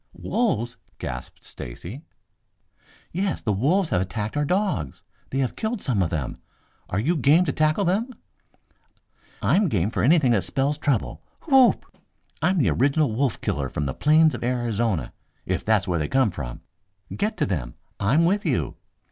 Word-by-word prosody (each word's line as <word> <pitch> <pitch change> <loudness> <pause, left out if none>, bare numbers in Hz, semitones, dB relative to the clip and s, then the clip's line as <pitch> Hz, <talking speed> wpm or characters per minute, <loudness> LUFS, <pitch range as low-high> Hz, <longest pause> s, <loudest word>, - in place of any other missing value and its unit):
"Wolves?" 125 - -1 0.2
gasped 60 0 -7
Stacy. 85 - -8 1.1
"Yes. 190 +2 -1
The 110 - -1
wolves 160 - +1
have 90 - +2
attacked 105 +4 -3
our 145 0 +1
dogs. 180 - -1 0.3
They 135 - -3
have 130 -2 0
killed 220 +1 -2
some 125 - 0
of 85 - +1
them. 75 -7 -3 0.5
Are 90 - -2
you 155 +11 +1
game 155 +5 +4
to - - 0
tackle 155 +5 +1
them?" 205 +8 +1 1.3
"I'm 175 - +3
game 100 +1 0
for - - -1
anything 140 -1 +4
that 110 -5 +3
spells 145 +2 -1
trouble. 140 -8 -1 0.2
Whoop! 270 -5 +4 0.6
I'm 185 +1 +2
the 120 - +3
original 140 - +2
wolf 130 +1 0
killer 70 -2 -2
from 75 - -3
the 65 - -2
plains 155 +1 +4
of - - -5
Arizona, 120 -6 -1 0.3
if - - -1
that's 105 -3 +2
where 90 -2 0
they 75 - -1
come 130 -6 +2
from. 70 -8 -6 0.5
Get 210 +2 -1
to 155 - +1
them! 75 - -3 0.2
I'm 135 +12 +3
with 200 +4 +2
you." - - -1
130 Hz, 165 wpm, -24 LUFS, 100-165 Hz, 1.3 s, game